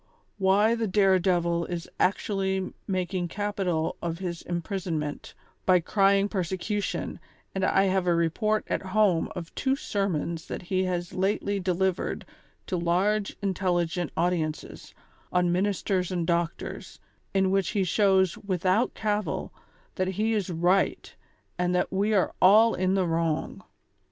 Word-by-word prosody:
'' - - -43
Why 210 +4 +4
the 230 -1 -1
dare 190 -1 +4
devil 170 -2 +1
is 175 -1 -5
actually 190 -1 0
making 185 -1 -1
capital 190 -4 -2
of 170 -1 -3
his 175 -2 -4
imprison 175 0 -3
ment, 150 -1 -5 0.3
by 185 -1 +5
crying 195 +3 +3
persecution, 195 +1 -3 0.3
and 190 - -2
I 190 +1 +3
have 190 -1 +1
a 175 - +4
report 210 +6 +1
at - - -1
home 190 -3 +2
of 170 -2 -7
two 265 -1 0
sermons 170 - -2
that - - -5
he 185 +1 0
has 175 -1 -3
lately 200 +1 0
delivered 185 0 -1 0.4
to 185 - -2
large 190 +5 0
intel 190 -2 0
ligent 175 -1 -1
audiences, 170 -3 -2 0.4
on 180 -1 +2
Ministers 190 0 0
and 175 -2 -1
Doctors, 170 0 -3 0.4
in 190 -1 +3
which 195 -2 +1
he 200 - +1
shows 190 -1 +2
without 190 +3 0
cavil 210 -6 -2 0.4
that 185 - -1
he 215 +4 0
is 205 -4 -1
right 175 +3 +1 0.4
and 180 0 +1
that 180 +1 0
we 205 +3 +1
are 190 - +2
all 215 +5 +7
in 185 +1 +1
the 190 -2 +2
wrong. 165 -2 -1
185 Hz, 145 wpm, -27 LUFS, 175-195 Hz, 0.4 s, all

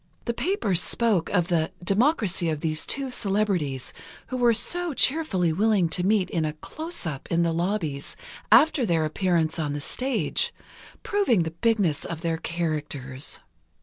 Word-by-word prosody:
The 235 - -1
papers 225 - 0
spoke 215 -7 +1
of 180 -3 +1
the 165 -2 +1
"democracy 200 - +2
of 155 -2 -2
these 155 -1 -1
two 270 -1 -2
celebrities, 195 - -1 0.4
who 255 - -3
were 240 -1 +4
so 340 +7 +1
cheerfully 220 - +2
willing 200 -2 +2
to 180 +3 0
meet 200 -1 +2
in 165 - 0
a 155 -1 -1
'closeup,' 180 - -4
in 170 0 +2
the 165 -1 +1
lobbies, 165 -5 -2 0.4
after 310 -4 +6
their 165 -7 +1
appearance 165 0 0
on 150 -2 -1
the 145 - -3
stage, 255 - -1 0.5
proving 395 - +2
the 160 - -4
bigness 190 -4 +1
of 165 -1 -6
their 165 -1 -1
characters." 150 -6 -3
180 Hz, 150 wpm, -25 LUFS, 160-230 Hz, 0.5 s, after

